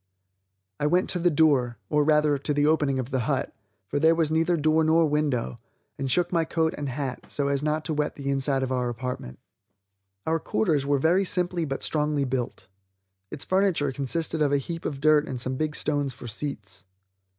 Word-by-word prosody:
I 145 Hz, -, +1 dB
went 180 Hz, +4 st, +2 dB
to 180 Hz, -, -2 dB
the 175 Hz, +1 st, +3 dB
door, 140 Hz, -6 st, +2 dB
or 150 Hz, -1 st, +2 dB
rather 150 Hz, -1 st, +3 dB
to 150 Hz, +2 st, -1 dB
the 145 Hz, 0 st, +2 dB
opening 150 Hz, -3 st, +2 dB
of 130 Hz, +1 st, -4 dB
the 130 Hz, -, 0 dB
hut, 135 Hz, -, -1 dB, 0.3 s
for 100 Hz, -, -2 dB
there 160 Hz, +2 st, +5 dB
was 160 Hz, -2 st, +1 dB
neither 165 Hz, +2 st, +2 dB
door 155 Hz, +1 st, +3 dB
nor 160 Hz, +1 st, +4 dB
window, 145 Hz, -, -1 dB, 0.4 s
and 135 Hz, -1 st, -3 dB
shook 175 Hz, +5 st, +1 dB
my 170 Hz, -2 st, +2 dB
coat 160 Hz, +1 st, 0 dB
and 145 Hz, -2 st, -4 dB
hat, 130 Hz, -1 st, -4 dB
so 140 Hz, -1 st, -1 dB
as 140 Hz, -1 st, 0 dB
not 155 Hz, +1 st, -1 dB
to 160 Hz, -, -1 dB
wet 150 Hz, 0 st, -1 dB
the 140 Hz, -1 st, -3 dB
inside 135 Hz, 0 st, +1 dB
of 130 Hz, -, -2 dB
our 125 Hz, -1 st, 0 dB
apartment. 120 Hz, -, -5 dB, 0.9 s
Our 160 Hz, +1 st, +1 dB
quarters 150 Hz, -7 st, 0 dB
were 145 Hz, 0 st, +3 dB
very 170 Hz, +7 st, +3 dB
simply 180 Hz, -2 st, 0 dB
but 135 Hz, -2 st, -4 dB
strongly 150 Hz, -2 st, +1 dB
built. 125 Hz, -2 st, -3 dB, 0.6 s
Its 135 Hz, -, -7 dB
furniture 185 Hz, -7 st, +1 dB
consisted 155 Hz, +4 st, -2 dB
of 145 Hz, -2 st, +3 dB
a 145 Hz, -, +3 dB
heap 165 Hz, +4 st, -5 dB
of 140 Hz, -3 st, -4 dB
dirt 155 Hz, 0 st, +4 dB
and 130 Hz, -, -4 dB
some 130 Hz, +2 st, -1 dB
big 155 Hz, +2 st, -2 dB
stones 145 Hz, -3 st, -1 dB
for 125 Hz, -, -11 dB
seats. 105 Hz, -6 st, -6 dB
150 Hz, 200 wpm, -26 LUFS, 135-160 Hz, 0.9 s, there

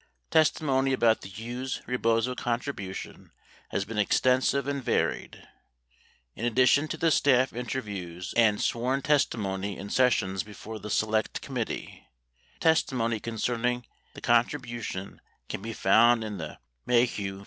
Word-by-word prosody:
Testimony 135 Hz, -4 st, +3 dB
about 115 Hz, -3 st, +3 dB
the -, -, -9 dB
Hughes 120 Hz, +6 st, -5 dB
Rebozo 115 Hz, 0 st, +1 dB
contribution 120 Hz, -6 st, -5 dB, 0.4 s
has 100 Hz, -, -1 dB
been 110 Hz, 0 st, -4 dB
extensive 130 Hz, +5 st, +2 dB
and 140 Hz, -2 st, -2 dB
varied. -, -, -1 dB, 0.9 s
In -, -, -7 dB
addition 130 Hz, +5 st, +4 dB
to -, -, -4 dB
the 165 Hz, -1 st, +2 dB
staff 130 Hz, -3 st, +3 dB
interviews 100 Hz, -8 st, -5 dB
and 110 Hz, -3 st, +4 dB
sworn 130 Hz, +4 st, 0 dB
testimony 100 Hz, -9 st, 0 dB
in 100 Hz, -, -7 dB
sessions 105 Hz, -7 st, +2 dB
before 110 Hz, +2 st, -9 dB
the 105 Hz, +2 st, -7 dB
Select 110 Hz, +1 st, 0 dB
Committee, -, -, -5 dB, 0.5 s
testimony 125 Hz, -8 st, +2 dB
concerning 120 Hz, +2 st, -1 dB, 0.3 s
the -, -, -9 dB
con 120 Hz, 0 st, +4 dB
tribution 120 Hz, -9 st, -6 dB, 0.3 s
can -, -, -5 dB
be 115 Hz, -, -5 dB
found 115 Hz, +3 st, +4 dB
in 105 Hz, -3 st, -5 dB
the 80 Hz, -2 st, -6 dB, 0.3 s
Maheu 115 Hz, -5 st, +1 dB
v. -, -, -11 dB
115 Hz, 130 wpm, -28 LUFS, 105-130 Hz, 0.9 s, addition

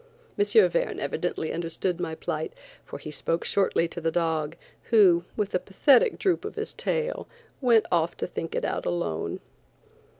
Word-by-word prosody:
M. 410 Hz, -, +2 dB, 0.3 s
Verne -, -, -1 dB
evidently 160 Hz, -, -2 dB
understood 170 Hz, +2 st, -2 dB
my 160 Hz, -2 st, -3 dB
plight, -, -, -4 dB, 0.3 s
for -, -, -8 dB
he 155 Hz, -, -8 dB
spoke 165 Hz, +2 st, -2 dB
shortly 190 Hz, -4 st, +2 dB
to 170 Hz, +1 st, -7 dB
the 165 Hz, -, +1 dB
dog, 160 Hz, -2 st, -1 dB, 0.3 s
who, 185 Hz, -6 st, +5 dB
with 210 Hz, -2 st, -1 dB
a 180 Hz, -, +2 dB
pathetic 285 Hz, -, +4 dB
droop 375 Hz, -2 st, +1 dB
of 420 Hz, -, -6 dB
his -, -, -4 dB
tail, 485 Hz, +1 st, -2 dB, 0.3 s
went 235 Hz, -4 st, +4 dB
off 170 Hz, -1 st, +1 dB
to -, -, -2 dB
think 165 Hz, -2 st, -5 dB
it -, -, -1 dB
out -, -, -2 dB
alone. 170 Hz, -, -2 dB
175 Hz, 165 wpm, -26 LUFS, 165-235 Hz, 0.3 s, who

